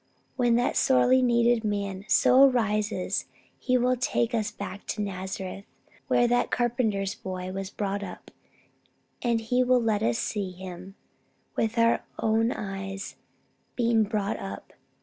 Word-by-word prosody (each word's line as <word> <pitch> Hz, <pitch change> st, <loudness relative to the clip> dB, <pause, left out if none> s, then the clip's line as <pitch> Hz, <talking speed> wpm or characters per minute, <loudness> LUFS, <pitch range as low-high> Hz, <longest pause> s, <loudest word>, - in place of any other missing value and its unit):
When 240 Hz, -2 st, +3 dB
that 245 Hz, +2 st, +1 dB
sorely 255 Hz, 0 st, +4 dB
needed 235 Hz, -1 st, +3 dB
man 200 Hz, -2 st, -3 dB
so 255 Hz, +2 st, +5 dB
arises 215 Hz, -5 st, -1 dB, 0.3 s
he 255 Hz, -1 st, +2 dB
will 250 Hz, +1 st, +2 dB
take 240 Hz, -1 st, 0 dB
us 220 Hz, -1 st, 0 dB
back 200 Hz, -2 st, -8 dB
to 210 Hz, -, -2 dB
Nazareth 190 Hz, 0 st, -5 dB, 0.4 s
where 240 Hz, -, +3 dB
that 245 Hz, +1 st, +1 dB
carpenter's 220 Hz, -5 st, 0 dB
Boy 185 Hz, -1 st, -6 dB
was 195 Hz, 0 st, -4 dB
brought 200 Hz, 0 st, -3 dB
up, 190 Hz, -3 st, -9 dB, 0.9 s
and 235 Hz, -2 st, +1 dB
he 245 Hz, +3 st, +1 dB
will 255 Hz, 0 st, +4 dB
let 220 Hz, -3 st, 0 dB
us 115 Hz, 0 st, +1 dB
see 200 Hz, -4 st, -3 dB
Him 185 Hz, +1 st, -9 dB, 0.6 s
with 225 Hz, +1 st, -1 dB
our 230 Hz, 0 st, +3 dB
own 225 Hz, +1 st, +2 dB
eyes 195 Hz, -2 st, -5 dB, 0.6 s
being 235 Hz, -2 st, +3 dB
brought 205 Hz, -1 st, -1 dB
up. 100 Hz, +1 st, -8 dB
215 Hz, 140 wpm, -27 LUFS, 195-240 Hz, 0.9 s, so